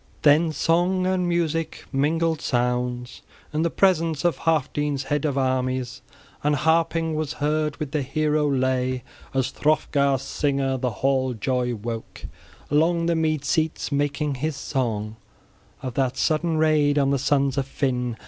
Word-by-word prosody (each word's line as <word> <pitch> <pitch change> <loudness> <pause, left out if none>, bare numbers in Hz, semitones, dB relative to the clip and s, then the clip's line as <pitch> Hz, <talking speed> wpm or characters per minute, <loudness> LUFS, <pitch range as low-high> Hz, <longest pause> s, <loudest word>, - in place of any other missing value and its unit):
Then 155 +2 +5
song 175 +4 +1
and 185 -1 +1
music 165 -2 -1
mingled 160 +3 +1
sounds 125 0 -1 0.3
in 155 - 0
the 170 - +2
presence 165 -4 +2
of 175 - +3
Healfdene's 145 -3 0
head 145 +2 -1
of 140 -2 0
armies 130 -2 -1 0.4
{16c} - - -15
and 150 0 +3
harping 160 +2 +1
was 155 -1 -2
heard 150 0 -1
with 150 -3 -5
the 150 -2 0
hero 150 +2 +1
lay 130 -1 0 0.3
as 130 0 +1
Hrothgar's 140 -3 +1
singer 135 -1 0
the 125 0 0
hall 130 +3 0
joy 125 +1 -1
woke 115 +1 -6 0.5
along 165 +3 +2
the 170 0 +2
mead 155 -3 0
seats, 160 +3 0
making 145 +1 0
his 155 -1 -1
song 110 -6 -2 0.7
of 130 -2 -4
that 130 0 0
sudden 160 +2 +1
raid 155 -2 +3
on 140 -1 +3
the 140 - +1
sons 140 0 +1
of 135 -1 -1
Finn. 125 -4 -1
145 Hz, 150 wpm, -24 LUFS, 130-155 Hz, 0.7 s, Then